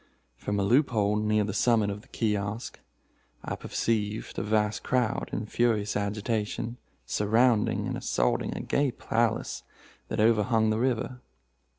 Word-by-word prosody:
From 105 0 -2
a - - +2
loop 125 +9 +4
hole 105 -3 +1
near 105 0 +2
the 100 -1 -3
summit 110 -3 +3
of 100 +1 -6
the 125 - -22
kiosk, 105 0 -2 0.7
I - - -2
perceived 110 -1 -2
a - - -1
vast 105 0 +1
crowd, 125 -4 0
in 105 - -3
furious 110 -2 +1
agitation, 105 +3 -2 0.3
surrounding 110 +2 +2
and - - -2
assaulting - - 0
a - - -3
gay 140 -1 +1
palace 115 -1 -1 0.5
that - - -3
overhung 110 0 +3
the 110 - 0
river. 125 0 -1
110 Hz, 145 wpm, -28 LUFS, 105-115 Hz, 0.7 s, loop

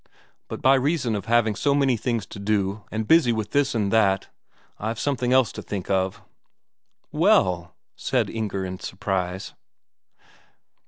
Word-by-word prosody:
But - - -7
by 130 - +6
reason 135 -3 +1
of 100 - -4
having 115 -1 +2
so 140 +5 +1
many 135 -3 +3
things 115 -2 -2
to 100 - -10
do, 100 0 -1
and 110 0 -3
busy 160 -7 +5
with 110 -2 -3
this 140 -3 +1
and 105 -2 0
that, 100 -4 +2 0.5
I've 110 +2 -3
something 125 -4 -1
else 130 -3 +4
to - - -7
think 100 -3 -5
of." 95 -1 -1 0.9
"Well 85 -2 +2
...?" - - -63
said - - 0
Inger 105 -4 -3
in 95 0 -6
surprise. 95 -1 -3
110 Hz, 155 wpm, -24 LUFS, 95-125 Hz, 0.9 s, by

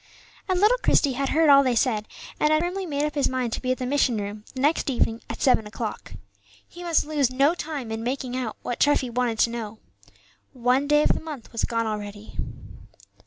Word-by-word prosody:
And 370 -1 +2
little 440 +6 +4
Christie 285 - +3
had 275 +1 -1
heard 320 0 +3
all 280 -1 +8
they 255 -3 +1
said, 220 -3 +1 0.3
and 300 - +3
had 310 +1 +3
firmly 365 +2 -3
made 290 -1 -1
up 300 - -3
his 285 -2 +1
mind 255 -3 -2
to - - -3
be 255 - -1
at 255 - 0
the 255 - -3
mission 260 -3 +2
room 205 +1 -5
the - - -5
next 290 +2 +2
evening 230 -3 0
at - - -5
seven 235 -5 +3
o'clock. 215 0 -6 0.5
He 350 - -12
must 340 -3 +1
lose 295 -4 +1
no 275 +5 +3
time 295 -9 -5
in 225 0 -4
making 255 0 -3
out 245 -4 -3
what 245 - -3
Treffy 285 -4 +2
wanted 240 -2 0
to 230 - +3
know. 225 -2 -6 0.8
One 255 +2 +1
day 295 0 +4
of - - +2
the - - -3
month 300 -7 -8
was 230 - -1
gone 230 -1 -1
already. 210 -1 -6
255 Hz, 215 wpm, -25 LUFS, 230-295 Hz, 0.8 s, all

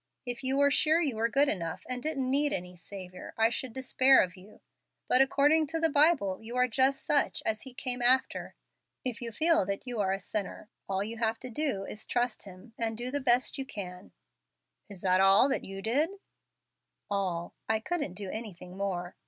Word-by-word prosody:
If 245 -1 -4
you 265 +1 +1
were 285 0 +4
sure 310 +3 +3
you 290 -8 0
were 225 +1 0
good 280 +4 +3
enough 170 -9 -3
and 250 -1 -1
didn't 275 -3 -2
need 285 +3 +2
any 180 0 -4
Saviour, 185 +1 -9
I 225 +1 +3
should 255 +1 -3
despair 260 +2 +5
of 180 +1 -6
you. 195 +3 -16 0.5
But 255 - +5
according 290 +3 +3
to 325 +3 -2
the 325 0 +2
Bible 285 - +3
you 230 +2 -8
are 250 0 +3
just 265 +3 +1
such 290 -1 +1
as 220 0 0
He 260 -2 -11
came 250 -2 -2
after. 255 +2 +2 0.5
If 250 -2 -3
you 235 -1 -4
feel 320 - +3
that 200 +4 -3
you 245 -3 -4
are 190 -2 +1
a 195 - -1
sinner, 200 +1 -4 0.2
all 195 0 0
you 225 +2 -6
have 225 0 0
to 255 - -7
do 230 -7 -2
is 210 - -8
to - - -11
trust 245 -2 0
Him 195 +4 -13
and 225 -1 -1
do 245 +2 -4
the 285 - -1
best 255 +2 +2
you 270 - -3
can." 180 -4 -8 0.8
"Is 195 -3 -6
that 185 0 +3
all 195 +8 +5
you 195 -5 -5
did?" 280 +9 +1 1.0
"All. 180 -4 -2 0.2
I 220 0 +2
couldn't 290 - -3
do 195 -1 -6
anything 190 -5 -8
more. 185 -3 -3
230 Hz, 200 wpm, -29 LUFS, 195-270 Hz, 1.0 s, despair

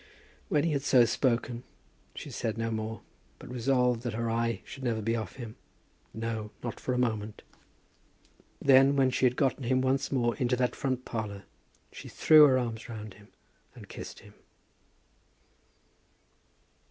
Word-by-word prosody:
When 145 - +2
he 165 - +1
had 140 -2 0
so 130 -3 +5
spoken 120 -1 0 0.5
she - - -7
said 110 -1 -3
no 115 0 -2
more, 110 -1 -4 0.4
but - - -11
resolved 125 -1 +1
that 120 -3 -4
her 115 0 -1
eye 115 0 -1
should 135 - -10
never 120 -4 -1
be 115 +2 0
off 110 -5 -5
him, 115 -4 -8 0.5
no, 110 -1 -4
not 120 - -5
for 125 - -2
a - - -1
moment. 110 -4 -2 1.2
Then, 135 +1 +6
when 135 -2 +3
she 130 - +3
had 125 - -1
gotten 135 -1 0
him 130 +2 +2
once 130 +1 0
more 120 -3 +1
into 125 -3 +1
that 125 0 0
front 130 -2 -2
parlour, 105 -4 -5 0.5
she - - -10
threw 155 -1 +7
her 130 -2 +4
arms 115 -3 -4
round 110 -3 -7
him 105 +2 -18 0.5
and - - -12
kissed - - -9
him. - - -16
120 Hz, 160 wpm, -29 LUFS, 115-130 Hz, 1.2 s, threw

